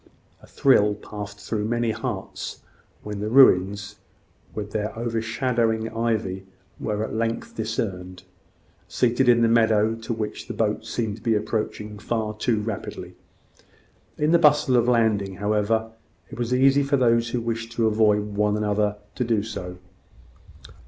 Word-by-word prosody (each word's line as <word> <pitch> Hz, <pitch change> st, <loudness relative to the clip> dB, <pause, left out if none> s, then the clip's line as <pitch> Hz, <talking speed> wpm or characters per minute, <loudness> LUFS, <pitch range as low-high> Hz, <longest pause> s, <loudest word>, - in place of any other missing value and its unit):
A -, -, -16 dB
thrill 105 Hz, -6 st, +3 dB
passed 105 Hz, 0 st, -8 dB
through 105 Hz, 0 st, -3 dB
many 120 Hz, 0 st, 0 dB
hearts 110 Hz, -5 st, -5 dB, 0.4 s
when 105 Hz, -1 st, -5 dB
the 105 Hz, +1 st, -2 dB
ruins, 100 Hz, -5 st, +4 dB, 0.6 s
with 105 Hz, -1 st, -5 dB
their 105 Hz, +1 st, -3 dB
overshadowing 115 Hz, 0 st, -1 dB
ivy, 110 Hz, -5 st, -1 dB, 0.3 s
were 105 Hz, 0 st, -2 dB
at -, -, -5 dB
length 115 Hz, +1 st, -2 dB
discerned, 95 Hz, -5 st, -4 dB, 0.6 s
seated 125 Hz, +1 st, +2 dB
in 120 Hz, -1 st, +5 dB
the -, -, +5 dB
meadow 110 Hz, -1 st, +3 dB
to 115 Hz, 0 st, -6 dB
which 110 Hz, -2 st, -4 dB
the -, -, -6 dB
boats 110 Hz, -1 st, -1 dB
seemed 110 Hz, -2 st, -3 dB
approaching 105 Hz, -1 st, -2 dB
far 110 Hz, 0 st, -2 dB
too 110 Hz, 0 st, 0 dB
rapidly. 105 Hz, -2 st, -6 dB, 1.0 s
In 150 Hz, +1 st, +1 dB
the 170 Hz, -, +5 dB
bustle 150 Hz, -4 st, +4 dB
of 120 Hz, -1 st, +3 dB
landing, 110 Hz, -5 st, +2 dB
however, 105 Hz, +3 st, 0 dB, 0.4 s
it -, -, -9 dB
was 120 Hz, 0 st, -2 dB
easy 135 Hz, +2 st, +4 dB
for 140 Hz, 0 st, +1 dB
those 115 Hz, -2 st, +2 dB
who 120 Hz, -, -1 dB
wished 115 Hz, 0 st, -4 dB
to 115 Hz, -1 st, +1 dB
avoid 105 Hz, -1 st, +2 dB
one 105 Hz, 0 st, +1 dB
another 105 Hz, 0 st, 0 dB, 0.2 s
to 125 Hz, -, -2 dB
do 115 Hz, -3 st, +1 dB
so. 90 Hz, -5 st, -6 dB
110 Hz, 145 wpm, -24 LUFS, 105-115 Hz, 1.0 s, in